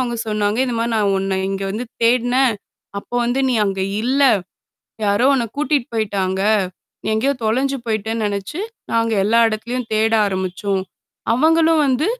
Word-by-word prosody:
அவுங்க 240 -2 -1
சொன்னாங்க. 210 +1 0
இந்தமாரி 235 -1 -1
நான் 205 -2 +2
உன்ன 190 0 -1
இங்க 195 0 -3
வந்து 220 +5 -3 0.2
தேடினேன். 245 +1 +3 0.4
அப்போ 220 - -10
வந்து 245 +3 0
நீ 255 - +1
அங்க 195 -1 -2 0.2
இல்ல. 265 +4 +1 0.8
யாரோ 205 +4 +2
உன்ன 250 -3 +1
கூட்டிட்டு 290 -4 0
போயிட்டாங்க. 195 -3 -1 0.6
நீ - - -9
எங்கேயோ 255 +6 +1
தொலைஞ்சு 265 +5 +1
போய்ட்டேன்னு 220 0 -2
நெனனச்சு, 205 - -3 0.3
நாங்க 230 0 +1
எல்லா 225 +3 +3
இடத்துலயும் 235 +3 -4
தேட 220 +1 +2
ஆரம்பிச்சோம். 190 0 -2 0.5
அவங்களும் 320 +3 +4
வந்து 265 +5 +1
230 Hz, 145 wpm, -19 LUFS, 205-255 Hz, 0.8 s, அவங்களும்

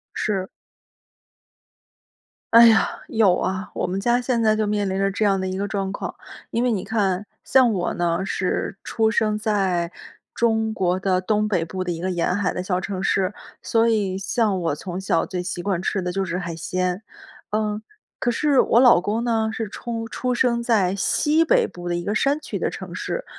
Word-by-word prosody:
是。 195 -3 -1 2.1
哎 235 0 +10
呀， 220 -1 +3
有 205 -5 +4
啊， 190 +2 -2
我 - - -1
们 185 +2 -2
家 240 +4 +2
现 245 -2 0
在 215 -1 +3
就 215 - 0
面 205 -1 0
临 190 - -2
着 195 0 +1
这 210 +2 0
样 195 -2 +2
的 190 - -2
一 185 - -3
个 200 +1 -2
状 195 -1 -2
况。 - - -5 0.4
因 235 - 0
为 250 - +2
你 195 -4 -1
看， 200 -3 0 0.2
像 255 -4 +4
我 180 -3 -1
呢， 175 +2 0
是 190 0 -2
出 220 -1 +1
生 215 -1 +1
在， 190 -6 0 0.4
中 220 -1 +1
国 185 -3 0
的 185 -1 +1
东 210 +3 +1
北 185 -6 0
部 185 +2 -4
的 180 - -2
一 165 - -4
个 185 - -2
沿 180 0 0
海 200 -1 0
的 180 - -3
小 180 -1 0
城 190 0 -4
市， 195 0 +1 0.3
所 230 0 +2
以 200 -4 0
像 205 0 0
我 165 -3 0
从 180 +3 -6
小 165 -3 +1
最 180 -1 -4
习 175 -1 -4
惯 185 -1 -1
吃 190 - -1
的 180 - -2
就 195 - 0
是 180 -1 -3
海 170 -2 -5
鲜。 180 +3 -2 0.5
嗯， 215 0 -1 0.4
可 240 - 0
是 280 +2 +3
我 235 - +3
老 245 -8 +6
公 220 +5 -1
呢， 225 -2 +1
是 220 0 -3
出 225 +2 -5
出 250 +2 -2
生 235 -1 +1
在 200 -6 +2
西 300 +10 +2
北 325 - +3
部 175 -1 -7
的 175 - 0
一 175 - -4
个 205 - -1
山 275 +6 +2
区 - - -5
的 - - -1
城 - - -8
市。 - - -4
200 Hz, 220 characters per minute, -23 LUFS, 185-225 Hz, 2.1 s, 哎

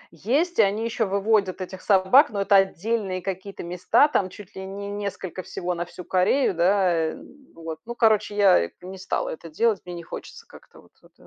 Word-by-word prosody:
Есть, 285 - 0
и - - +10
они 210 +2 +1
ещё 225 -2 -1
выводят 200 -1 +1
этих 185 0 -7
собак, 200 +9 +5
но 200 -2 -3
это 200 +1 +3
отдельные 195 0 0
какие-то 195 0 -6
места 180 - +3
там, 195 -10 0
чуть 200 0 -13
ли 190 - -6
не 200 +1 -7
несколько 200 -3 -5
всего 180 0 -4
на 175 0 -3
всю 180 +1 -11
Корею, 185 +7 +2
да, 180 +1 +2 0.2
эм, 265 - -14 0.2
вот. 165 -1 -7
Ну, 240 - -5
короче, 215 -3 +2
я, 190 - +5
э, - - -9
не 190 +1 -9
стала 190 - -2
это 165 +1 -8
делать. 215 +5 +1
Мне 175 -1 -7
не 170 - -8
хочется - - -10
как-то - - -17
вот - - -24
вот. - - -23
195 Hz, 200 wpm, -24 LUFS, 180-215 Hz, 0.2 s, и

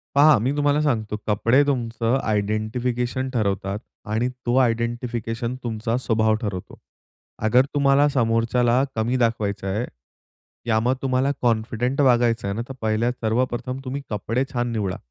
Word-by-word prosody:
पहा 150 +2 +7
मी 120 +5 0
तुम्हाला 145 0 +2
सांगतो. 110 -7 0
कपडे 115 +6 +3
तुमचं 120 -1 0
आयडेंटिफिकेशन 120 +5 -1
ठरवतात 100 -2 -1 0.3
आणि 120 +3 +1 0.2
तो 120 - +1
आयडेंटिफिकेशन 115 0 -2
तुमचा 115 0 -2
स्वभाव 110 -3 +2
ठरवतो. 95 -4 -5 0.7
अगर 125 +4 +5
तुम्हाला 140 +1 +4
समोरच्याला 120 0 +2
कमी 115 +3 0
दाखवायचं 110 -5 0
आहे, 105 +5 -1 0.8
या 110 -1 +3
मग 125 +3 +1
तुम्हाला 135 +1 +1
कॉन्फिडेंट 120 +3 0
वागायचं 120 -5 +3
आहे 100 - -2
ना, 115 - -2
तर 135 - -6
पहिल्या 110 +2 +1
सर्वप्रथम 125 +2 -2
तुम्ही 135 +2 -4
कपडे 115 +5 -1
छान 120 -1 -1
निवडा. 100 -5 -2
120 Hz, 135 wpm, -23 LUFS, 110-130 Hz, 0.8 s, पहा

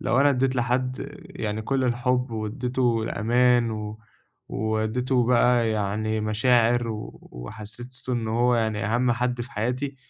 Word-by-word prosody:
لو 130 - +2
أنا 145 0 +5
ادّيت 130 0 +1
لحد 125 +1 -1 0.2
يعني 110 0 -4
كل 130 +2 0
الحُب 125 +1 0
وادّيته 120 +1 -1
الأمان 120 +2 +2
و 105 0 -5 0.5
وادّيته 110 +4 0
بقى 120 -2 +3
يعني 110 +1 -1
مشاعر 115 +2 +2
و 110 -1 -6
وحسِّسته 110 - -6
إنه 115 -2 -1
هو 125 0 +4
يعني 110 -2 0
أهَم 120 +2 +2
حد 125 0 -1
في 120 - -7
حياتي، 125 +6 -2
120 Hz, 135 wpm, -25 LUFS, 110-125 Hz, 0.5 s, أنا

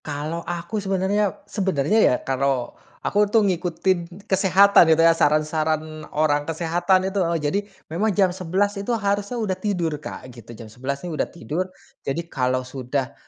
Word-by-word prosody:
Kalau 150 +3 -4
aku 175 +5 -4
sebenarnya 195 +1 0
sebenarnya, 190 -1 +1
ya, 125 - +5
kalau 135 -2 0 0.3
aku, 205 0 +2
tuh, 215 0 +4
ngikutin 175 0 -1
kesehatan 190 -2 +5
itu, 160 0 +5
ya, 165 - +7
saran-saran 155 0 0
orang 150 -1 +1
kesehatan 175 +3 +1
itu, 200 - +1
heeh. 170 -1 +1
Jadi 150 +5 0 0.3
memang 185 +8 -1
jam 190 -3 +2
11:00 190 +3 0
itu 235 +3 -1
harusnya 205 +3 -1
udah 215 -5 -1
tidur 180 -6 -2
Kak 145 - -8
gitu, 115 -1 -12
jam 115 - -9
11:00 140 +5 -4
nih, 175 - -4
udah 150 - -1
tidur. 175 +2 -4 0.3
Jadi 165 +5 -3
kalau 130 -5 -1
sudah 130 +1 -3
170 Hz, 160 wpm, -23 LUFS, 150-195 Hz, 0.3 s, ya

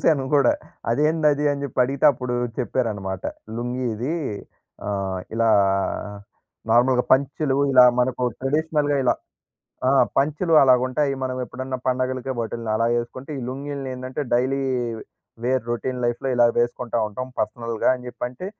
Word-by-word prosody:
చూసాను 140 -5 +3
గూడా, 140 -4 +5 0.4
అదేందది 150 +2 +2
అని 140 0 -4
చెప్పి 130 - -6
అడిగితే, 135 +1 -2
అప్పుడు 125 0 -4 0.2
చెప్పారన్నమాట. 105 -6 -2 0.3
"లుంగీ 125 +2 -3
ఇది, 125 +10 -2 0.7
ఆహ్, 95 -2 -2
ఇలా 115 0 +2 1.2
నార్మల్‌గా 125 +2 +4
పంచెలు 140 +1 +2 0.2
ఇలా, 125 -1 +8 0.2
మనకు 125 0 0 0.2
ట్రెడిషనల్‌గా 150 +1 +1
ఇలా, 125 - +3 0.7
ఆ! - - +4 0.3
పంచెలు 155 +4 +1
అలాగా 125 -2 +5
ఉంటాయి. 140 +2 0
మనం 130 0 -3
ఎప్పుడన్నా 130 +2 -5
పండగలకి 130 0 -1
బట్టల్ని 115 0 -4
అలా 115 +1 +1
వేసుకుంటే, 130 +4 -5
ఈ - - -4
లుంగీల్ని 140 +1 -5
ఏందంటే 130 +2 -5
డైలీ 130 +3 +1 0.8
వేర్ 130 -1 +1
రొటీన్ 125 +2 -2
లైఫ్‌లో 120 +3 -2
ఇలా 120 0 +6
వేసుకుంటా 120 0 0
ఉంటాం 130 +5 -6
పర్సనల్‌గా" 115 -2 -1
అని 125 0 -11
చెప్పంటే, 125 +9 -6
130 Hz, 130 wpm, -23 LUFS, 120-140 Hz, 1.2 s, ఇలా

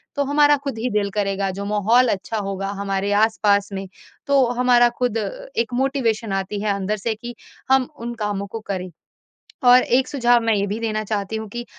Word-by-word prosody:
तो 285 - +1
हमारा 290 +1 +4
खुद 275 -5 -4
ही 245 +3 -1
दिल 205 -1 0
करेगा, 195 -1 -1
जो 200 +2 -6
माहौल 210 +5 +3
अच्छा 215 +3 -2
होगा 195 -1 -3
हमारे 195 0 -1
आस-पास 205 -1 +2
में, 195 0 -5 0.4
तो 280 -2 +4
हमारा 245 -1 +5
खुद 245 -3 0
अ, - - -6
एक 230 +1 0
मोटिवेशन 235 -5 0
आती 195 +1 -3
है 210 -1 0
अंदर 200 +2 -2
से 220 +2 -2
कि 240 +2 -8 0.4
हम 265 -1 +3
उन 235 +1 -5
कामों 205 -2 -3
को 225 +3 -6
करें। 185 -2 -4 0.8
और 250 +1 +8
एक 255 +2 +1
सुझाव 245 -3 +3
मैं 225 -1 +3
ये 200 -1 0
भी 210 +3 -3
देना 215 -1 -1
चाहती 210 0 -3
हूँ 220 -1 -5
कि 240 +3 -6
220 Hz, 200 wpm, -21 LUFS, 200-245 Hz, 0.8 s, और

